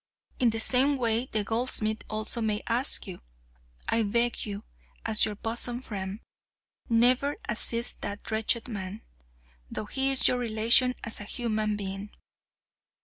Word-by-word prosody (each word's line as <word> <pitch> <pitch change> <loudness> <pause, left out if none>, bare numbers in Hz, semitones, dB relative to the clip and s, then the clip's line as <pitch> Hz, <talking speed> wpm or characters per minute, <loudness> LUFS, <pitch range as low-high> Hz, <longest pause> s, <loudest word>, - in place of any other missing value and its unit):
In 245 - +3
the 225 0 -2
same 270 +4 +3
way 235 0 +1
the 215 -4 -1
goldsmith 225 -1 -1
also 215 +2 -1
may 215 -1 -2
ask 245 +4 +3
you. 185 -4 -10 0.7
I 230 - +1
beg 235 +2 -1
you, 205 +1 -7 0.4
as 220 -2 +4
your 215 -1 -5
bosom 235 +3 0
friend, 195 -1 -7 0.7
never 250 +5 +2
assist 235 0 +2
that 205 +2 -7
wretched 220 +2 +2
man, 205 -2 -8 0.7
though - - -6
he 265 +5 0
is 270 - +5
your 250 - +1
relation 235 +2 +3
as 225 - +1
a - - -7
human 215 -2 -2
being. 195 0 -7
225 Hz, 145 wpm, -26 LUFS, 210-240 Hz, 0.7 s, is